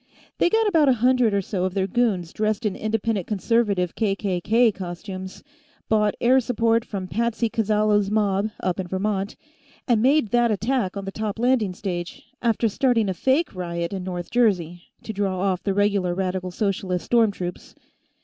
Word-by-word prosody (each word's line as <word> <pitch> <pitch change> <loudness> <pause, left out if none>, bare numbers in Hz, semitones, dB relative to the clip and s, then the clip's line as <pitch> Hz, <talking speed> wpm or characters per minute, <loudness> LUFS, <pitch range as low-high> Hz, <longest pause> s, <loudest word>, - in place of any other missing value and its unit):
They - - +4
got 445 +3 +2
about 320 -8 +4
a - - +6
hundred 250 -1 +3
or 200 -1 0
so 185 -1 -2
of 185 0 -2
their 190 -1 +1
goons 195 -5 0
dressed 215 +1 -1
in 205 - 0
Independent 215 -3 -1
Conservative 205 -4 +1
KKK 210 +2 +1
costumes, 185 +1 -7 0.5
bought 210 -1 +2
air 255 +2 +4
support 230 -2 +1
from 195 -5 -5
Patsy 230 +2 -1
Callazo's 210 -2 +2
mob, 205 -1 +1
up 180 0 -1
in 185 - -3
Vermont, 195 +2 -2 0.5
and 235 -4 +3
made 275 -1 +3
that 240 -1 +3
attack 215 -1 -1
on 200 - -5
the 195 - -4
top 215 +1 -4
landing 230 -5 +1
stage, 175 -2 -5 0.2
after 230 -1 +2
starting 225 -1 +1
a - - 0
fake 265 - +1
riot 170 -1 -4
in 190 -2 -4
North 180 -1 -5
Jersey, 180 -8 +1 0.2
to 220 - -5
draw 195 -2 -1
off 190 -1 0
the 195 -2 -1
regular 200 -3 +1
Radical 185 -1 -2
Socialist 185 -2 -2
storm 230 -2 +4
troops. 180 -3 -7
205 Hz, 170 wpm, -23 LUFS, 185-230 Hz, 0.5 s, a